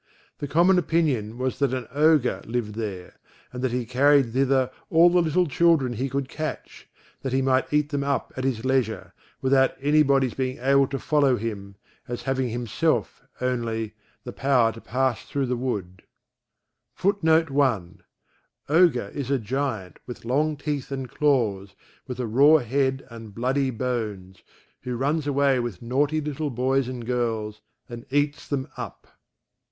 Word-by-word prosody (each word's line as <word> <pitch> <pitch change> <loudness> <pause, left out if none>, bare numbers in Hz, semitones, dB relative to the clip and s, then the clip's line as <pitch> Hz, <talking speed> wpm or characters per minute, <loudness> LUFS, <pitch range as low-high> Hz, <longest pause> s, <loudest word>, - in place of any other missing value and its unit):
The 145 - -4
common 175 +5 +4
opinion 140 -10 0
was 130 0 -2
that 135 -2 +1
an 125 -3 -5
Ogre 150 -3 +3
lived 115 -2 -2
there, 100 -5 -6 0.4
and 125 0 -5
that 130 - +1
he 125 0 -2
carried 135 0 +3
thither 130 -1 +2 0.2
all 170 +2 +6
the 180 0 +4
little 170 +2 +2
children 155 -4 +2
he 130 +4 -2
could 135 0 -2
catch, 155 +3 -6 0.3
that 135 -2 -3
he 135 0 +2
might 130 0 +1
eat 150 0 +2
them 145 -2 -1
up 140 -1 -2
at 130 - -4
his 130 -3 -1
leisure, 130 -4 -1 0.3
without 130 0 +3
any 145 +3 +3
body's 135 -4 +2
being 130 -1 -2
able 135 +2 +3
to 135 - -3
follow 145 -3 +2
him, 100 -3 -5 0.3
as 120 0 -5
having 130 -2 -1
himself, 120 -1 -1 0.2
only, 115 -3 -2 0.3
the - - -7
power 125 -3 +2
to 115 - -12
pass 130 -1 -1
thro' 140 -3 -2
the 125 0 -1
wood. 100 -7 -4 0.9
[Footnote 165 -5 +2
1: 105 -10 0 0.7
OGRE 155 - +3
is 140 -3 -4
a 140 - +2
giant, 120 -5 -3
with 125 -2 -9
long 150 +5 +1
teeth 145 -2 -4
and 135 -1 -4
claws, 115 -11 0 0.3
with 125 0 -6
a 125 - -1
raw 140 +8 +6
head 135 0 -1
and 115 -3 -10
bloody 130 +3 0
bones, 110 -7 -4 0.4
who 125 -1 -4
runs 145 +3 0
away 140 -2 +2
with 120 -5 -4
naughty 140 +6 +1
little 150 0 -3
boys 130 +1 0
and 125 -2 -6
girls, 115 -3 -2 0.3
and 120 0 -9
eats 145 +1 0
them 140 -1 -2
up. - - -8
130 Hz, 160 wpm, -25 LUFS, 120-140 Hz, 0.9 s, all